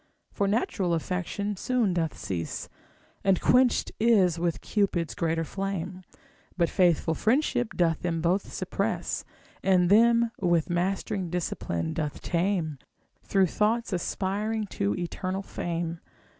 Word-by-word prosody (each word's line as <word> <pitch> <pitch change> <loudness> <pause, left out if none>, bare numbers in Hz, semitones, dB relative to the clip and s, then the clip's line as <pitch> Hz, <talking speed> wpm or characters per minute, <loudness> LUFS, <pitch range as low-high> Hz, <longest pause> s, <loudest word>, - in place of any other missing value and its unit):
For 200 - 0
natural 195 -4 +1
affection 185 +5 -2
soon 230 -1 +1
doth 165 -3 -1
cease, 85 -4 -4 0.6
And 195 -1 +3
quenched 250 -1 +3
is 195 -7 +4
with 170 -1 -1
Cupid's 190 -6 0
greater 165 -1 0
flame; 185 0 -4 0.6
But 170 -2 +2
faithful 175 -3 +3
friendship 245 - +1
doth 165 -3 +2
them 170 -2 -1
both 175 +4 0
suppress, - - -2 0.4
And 185 -1 +3
them 235 +2 +5
with 175 -2 +1
mastering 190 +1 -1
discipline 160 - -2
doth 150 -3 -3
tame, 170 -5 -1 0.4
Through 195 -1 +3
thoughts 215 +5 0
aspiring 205 +5 -1
to 100 +1 0
eternal 185 +2 -3
fame. 170 -2 -3
185 Hz, 120 wpm, -27 LUFS, 170-205 Hz, 0.6 s, them